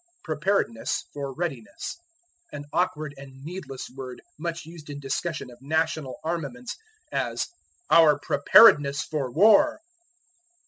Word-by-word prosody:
Preparedness 155 - -1
for 140 -1 -4
Readiness. 135 -7 -5 0.6
An 145 -1 -7
awkward 155 -5 0
and 135 -1 -12
needless 155 -5 -7
word 130 -2 -7 0.2
much 165 -1 -4
used 160 -2 -12
in 145 0 -6
discussion 140 0 -3
of 120 +1 -16
national 155 -1 -1
armaments, 140 -7 -4 0.4
as, - - -1 0.4
"Our 155 -3 +7
preparedness 145 0 +6
for 150 -5 -3
war." 220 - +5
150 Hz, 110 wpm, -26 LUFS, 135-165 Hz, 0.6 s, Our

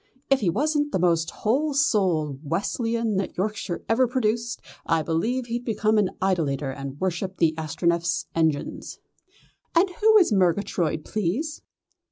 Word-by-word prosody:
If 275 - +5
he 195 - +1
wasn't 295 - 0
the - - +1
most 170 -2 +2
whole 275 +7 0
souled 185 - +1
Wesleyan 225 - -1
that 195 - -3
Yorkshire 200 -2 -3
ever 250 +3 +3
produced, 235 -1 -1 0.2
I 165 -1 +1
believe 225 +12 -1
he'd 240 +1 -3
become 215 -2 +1
an 195 -3 +2
idolater 150 -8 0
and 140 +1 -7
worship 185 +1 -2
the 165 -2 +3
Astronef's 165 +1 0
engines." 160 -3 -1 0.8
"And 345 +4 +5
who 435 +4 +4
is 360 - +4
Murgatroyd, 175 -4 +1
please?" 215 - -2
195 Hz, 140 wpm, -25 LUFS, 165-240 Hz, 0.8 s, If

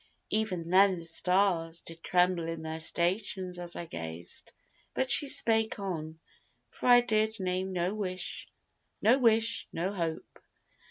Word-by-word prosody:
Even 185 -6 -2
then 190 0 +5
the 170 - -8
stars 170 -1 +1
Did 165 0 -7
tremble 180 -1 +1
in 165 -1 -5
their 160 0 -5
stations 180 +2 -1
as 175 -1 -5
I 170 - -5
gazed; 80 - -7 0.4
But 260 -1 0
she 290 - +6
spake 225 -4 +2
on, 160 -5 -5 0.5
for - - -5
I 245 0 +8
did 220 -2 0
name 185 0 -2
no 180 +1 -1
wish, 185 -3 -3 0.5
No 240 +6 +4
wish 230 -2 +3
no 180 +4 -2
hope. 165 -4 -5
185 Hz, 145 wpm, -30 LUFS, 165-215 Hz, 0.5 s, I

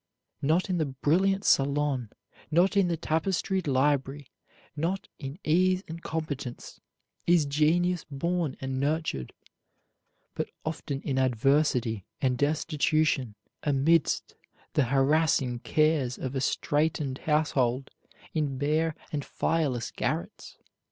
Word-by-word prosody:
Not 160 +6 +2
in 180 -2 0
the 155 - +1
brilliant 185 +9 +1
salon, 140 -3 +2 0.4
not 175 +6 +3
in 195 -2 +4
the 170 -1 -1
tapestried 175 +3 -1
library, 140 0 0 0.4
not 170 +6 -2
in 135 +3 -6
ease 185 +4 +3
and 165 +1 -7
competence, 145 -7 -5 0.5
is 170 -3 +5
genius 160 +4 +2
born 170 +1 -1
and 135 0 -3
nurtured; 145 - -1 1.0
but - - -3 0.2
often 150 -3 -4
in 135 -2 0
adversity 125 -3 +2 0.2
and 130 -2 +1
destitution, 150 -4 +1 0.3
amidst 145 +3 +2 0.4
the 145 - +3
harassing 135 -1 +2
cares 155 -3 +1
of 130 -1 -4
a 135 - -1
straitened 145 -1 0
household, 135 -4 +1 0.4
in 145 -4 -1
bare 155 +3 +1 0.2
and 145 -3 -2
fireless 140 -9 -1
garrets. - - -4
150 Hz, 110 wpm, -28 LUFS, 135-160 Hz, 1.0 s, is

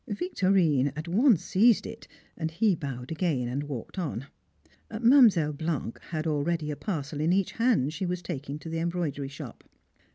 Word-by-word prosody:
Victorine 185 - +2
at 155 +3 -6
once 215 - +3
seized 220 +3 +4
it, 225 +1 -9 0.3
and 160 -1 -2
he 195 +6 +2
bowed 135 -5 -6
again 155 -7 0
and 130 +4 -2
walked 145 - -6
on. 140 -7 -3 0.6
Mademoiselle 220 - +5
Blanc 150 -6 -3
had 155 -1 -3
already 155 0 -1
a - - -3
parcel 150 -5 -4
in 160 +3 +2
each 190 0 +1
hand 225 - +1
she 180 +4 -3
was 180 0 -3
taking 145 -3 -5
to 155 - -11
the 165 0 -2
embroidery 165 -5 -2
shop. 140 - -10
165 Hz, 165 wpm, -28 LUFS, 145-190 Hz, 0.6 s, Mademoiselle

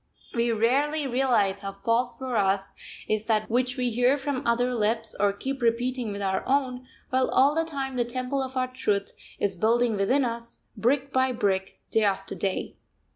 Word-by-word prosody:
We 235 0 +1
rarely 280 +7 +2
realise 240 -7 +2
how 195 -1 -5
false 230 +4 0
for 255 0 -4
us 195 -1 +1 0.3
is 215 0 0
that 215 -2 +1
which 250 +2 +1
we 250 -1 +1
hear 245 +4 +3
from 275 -2 -2
other 245 +2 +2
lips, 225 0 0
or 200 0 +3
keep 265 +6 -5
repeating 240 0 0
with 200 0 -4
our 190 -1 0
own, 255 -2 0 0.2
while 260 0 +2
all 275 +3 +4
the 325 +1 +1
time 270 -4 -3
the 240 - +3
temple 255 +3 -2
of 260 0 -4
our 255 0 +1
Truth 200 -5 -1 0.2
is 200 -2 0
building 230 +4 +2
within 250 +8 +2
us, 235 0 -5 0.2
brick 275 +3 0
by 260 0 +3
brick, 190 -4 -1
day 220 - +4
after 195 -1 0
day. 195 -1 -3
240 Hz, 180 wpm, -26 LUFS, 210-260 Hz, 0.3 s, all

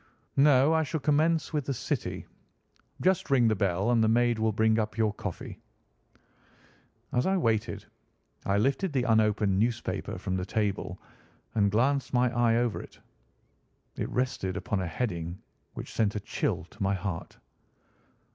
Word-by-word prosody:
"No, 140 +1 +5
I 160 - +3
shall 160 +1 -2
commence 155 +3 +2
with 150 -3 -1
the 135 - -2
City. - - -3 0.8
Just 185 -4 +2
ring 130 -4 +4
the 110 - +2
bell 95 +3 +1
and 115 -2 +4
the - - +4
maid 120 0 +3
will 110 0 +2
bring 110 +1 +2
up 110 0 -2
your 110 -2 +2
coffee." - - -6 1.5
As 125 - +1
I 190 0 +2
waited, 115 - 0 0.6
I 100 +1 +1
lifted 140 - +1
the 130 -3 +1
unopened 105 -4 +2
newspaper 115 +1 -1
from 95 - -3
the 90 - -2
table 100 -4 -2 0.5
and 100 -2 +3
glanced 130 +5 +1
my 125 0 +2
eye 120 -1 +3
over 120 -1 0
it. - - -14 1.0
It - - -3
rested 125 -7 -1
upon 105 -5 -2
a 95 - -2
heading 85 -3 -3 0.4
which - - -7
sent 105 -2 +1
a - - 0
chill 85 - -2
to 110 - -15
my 100 0 +2
heart. 95 -3 -5
115 Hz, 155 wpm, -28 LUFS, 100-130 Hz, 1.5 s, No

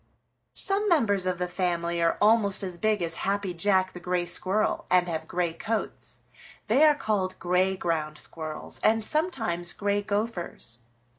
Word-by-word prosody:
"Some 405 +1 +1
members 205 - +2
of 180 -1 0
the 180 0 -2
family 170 -2 -1
are 165 0 +2
almost 210 -2 +3
as 180 -2 -5
big 215 -4 +1
as 165 -1 -1
Happy 200 -1 -1
Jack 185 +1 +1
the 180 - -8
Gray 180 0 -1
Squirrel 190 +4 +1
and 180 -1 +4
have 160 -2 -4
gray 175 -2 -1
coats. 215 +6 -4 0.4
They 240 +7 +4
are 300 -1 +5
called 190 -7 -1
Gray 185 +2 +1
Ground 155 -4 -2
Squirrels 155 -1 -6
and 220 0 +2
sometimes 225 - 0
Gray 205 0 0
Gophers. 205 - -3
185 Hz, 155 wpm, -27 LUFS, 175-215 Hz, 0.4 s, are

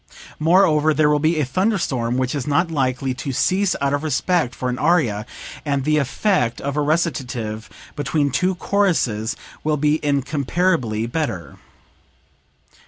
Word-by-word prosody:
Moreover 155 -2 +4
there 150 0 +3
will 150 - +2
be 155 +1 +1
a 150 - +1
thunder 190 - +1
storm 125 -7 -1
which 130 0 0
is 140 -3 -3
not 165 +4 +1
likely 130 -3 0
to 130 +2 -5
cease 185 +8 +1
out 140 0 0
of 145 - 0
respect 155 -2 0
for 125 - -3
an 125 0 -2
aria, 125 -10 +1 0.4
and 140 -2 -1
the 155 +2 +2
effect 140 - 0
of 140 0 -3
a 150 - +1
recitative 130 -9 -2 0.3
between 145 0 0
two 180 +9 +1
choruses 155 - 0 0.3
will 155 0 +1
be 150 +2 +1
incomparably 140 -3 0
better." 115 - -4
145 Hz, 150 wpm, -21 LUFS, 125-160 Hz, 0.4 s, Moreover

